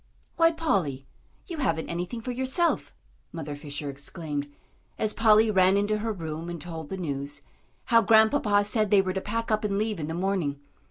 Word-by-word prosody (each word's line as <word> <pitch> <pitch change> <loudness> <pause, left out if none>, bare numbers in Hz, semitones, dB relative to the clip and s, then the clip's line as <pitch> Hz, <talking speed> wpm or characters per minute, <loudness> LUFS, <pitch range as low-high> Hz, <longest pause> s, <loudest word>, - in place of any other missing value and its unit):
"Why, 330 0 +5
Polly, 180 - -1 0.4
you 340 -4 -6
haven't 165 - 0
anything 175 +7 -4
for 250 - -4
yourself," 265 +7 0 0.4
Mother 150 -3 -5
Fisher 145 0 -6
exclaimed, 145 +1 -5 0.5
as 215 -1 0
Polly 220 -1 +5
ran 190 0 +4
into 210 +1 +1
her 225 +1 -2
room 165 -3 -5
and 170 -1 -5
told 160 -1 -7
the 190 - -4
news 145 -4 -3 0.4
how 230 -1 +5
Grandpapa 220 -1 +4
said 215 0 +1
they 200 -2 +5
were 185 -1 -2
to 190 - -2
pack 230 +3 -2
up 215 0 +1
and 200 -1 0
leave 215 -2 -1
in 150 - -3
the 160 - -3
morning. 175 -6 -1
195 Hz, 180 wpm, -27 LUFS, 160-220 Hz, 0.5 s, Why